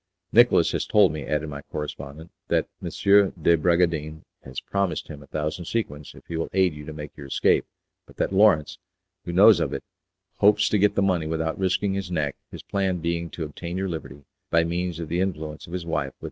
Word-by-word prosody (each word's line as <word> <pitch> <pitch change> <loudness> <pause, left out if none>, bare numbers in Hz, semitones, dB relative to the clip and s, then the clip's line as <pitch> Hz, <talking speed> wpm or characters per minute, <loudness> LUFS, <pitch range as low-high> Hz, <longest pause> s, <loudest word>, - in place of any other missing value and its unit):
"Nicolas - - +5
has - - -2
told - - +5
me," 75 -2 -6
added 75 +1 -1
my 70 -1 -6
correspondent, 75 +2 -7 0.2
"that - - +1
M. - - -4 0.5
de 85 +2 +4
Bragadin 80 -2 +1 0.2
has 65 -1 -6
promised 100 -2 -2
him 75 -1 -8
a 70 - -14
thousand 75 +3 -3
sequins 75 -9 -4
if - - -15
he 85 - -5
will 80 - -2
aid 95 -3 +3
you 75 0 -10
to - - -5
make 75 -1 -8
your 70 -2 -9
escape - - +2 0.4
but - - -18
that - - -1
Lawrence, 85 -8 +4 0.5
who 85 - -4
knows 100 +3 +7
of 80 -4 -1
it, - - -4 0.5
hopes 105 +1 +4
to 105 - +2
get 105 +1 +3
the 100 - +2
money 90 -5 +1
without 80 +4 -2
risking 95 +1 +1
his 95 -2 -3
neck, 75 -5 -1
his - - -10
plan 95 -2 -1
being 85 0 -2
to 80 - -6
obtain 85 +4 -6
your 95 0 -2
liberty 70 -4 -7 0.3
by 85 0 +3
means 85 0 -2
of 85 - -4
the 85 +3 -1
influence 80 -5 -4
of 85 - -10
his 90 -2 -4
wife 75 -4 -1
with 65 - -12
M. - - -56
85 Hz, 215 wpm, -25 LUFS, 75-90 Hz, 0.5 s, knows